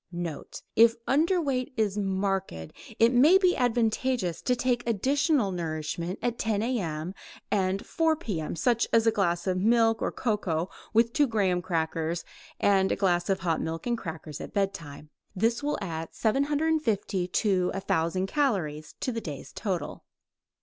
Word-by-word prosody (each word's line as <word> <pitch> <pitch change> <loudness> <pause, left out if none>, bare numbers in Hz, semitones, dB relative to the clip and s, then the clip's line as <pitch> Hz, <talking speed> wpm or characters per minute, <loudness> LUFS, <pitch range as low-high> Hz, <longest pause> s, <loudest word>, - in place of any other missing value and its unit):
Note: 170 -3 -6
If 230 0 +6
underweight 290 -3 +1
is 210 -3 +1
marked, 195 -1 -1 0.5
it 230 +2 +4
may 295 +10 +7
be 370 -2 +3
advantageous 240 - 0
to 250 - +1
take 245 -1 0
additional 270 - +2
nourishment 170 +1 -3
at 240 -1 -1
10 215 -1 0
A.M. 180 -8 -2 0.4
and 190 -1 0
4 325 -1 +1
P.M., 190 - -4
such 235 +7 +1
as 230 -1 +4
a 225 - +5
glass 175 -5 0
of 185 -1 0
milk 225 +2 +3
or - - 0
cocoa 190 -7 -1 0.2
with 230 +1 +3
2 290 -2 +3
graham 195 -6 +1
crackers 165 -1 -2 0.3
and 195 -1 +3
a - - +2
glass 175 -2 +1
of 190 0 +1
hot 165 -3 0
milk 165 0 -4
and 240 -1 +1
crackers 160 -7 -7
at - - -8
bedtime. 155 -7 -3 0.2
This 230 +5 +1
will 295 +1 -1
add 165 -2 -5
750 275 - 0
to 185 -1 +1
1000 185 -1 0
calories 190 - -1
to 255 - -1
the 230 -1 -3
day's 150 -8 -8
total. 190 -5 -4
200 Hz, 150 wpm, -27 LUFS, 175-240 Hz, 0.5 s, may